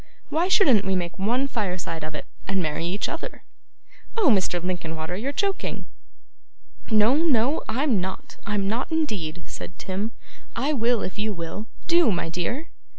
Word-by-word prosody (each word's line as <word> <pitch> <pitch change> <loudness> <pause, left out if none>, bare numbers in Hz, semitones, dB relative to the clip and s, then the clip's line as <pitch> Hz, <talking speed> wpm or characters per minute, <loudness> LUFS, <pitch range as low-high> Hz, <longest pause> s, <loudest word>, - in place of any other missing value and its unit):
Why 335 +3 +2
shouldn't 285 - +6
we 190 -1 +1
make 175 +1 -2
one 245 +7 +2
fireside 180 - -2
of 155 0 -5
it, - - -5 0.2
and 195 0 +1
marry 165 0 -1
each 195 +4 0
other?' 330 - -5 0.7
'Oh, 405 -10 +5
Mr. 190 -5 +3
Linkinwater, 170 -2 -2
you're 245 +9 -2
joking!' 395 +6 -1 1.0
'No, 220 +4 +5
no, 290 -3 +3
I'm 240 -3 +2
not. 190 +1 -5
I'm 205 -1 0
not 235 +9 -1
indeed,' 195 - -1
said 175 - -8
Tim. 195 +4 -2 0.4
'I 275 +6 +1
will, 235 -3 +2
if 185 +3 -4
you 215 0 0
will. 170 +5 -5 0.2
Do, 340 -7 +5
my 175 -3 -1
dear! 235 - -2
210 Hz, 155 wpm, -25 LUFS, 180-270 Hz, 1.0 s, shouldn't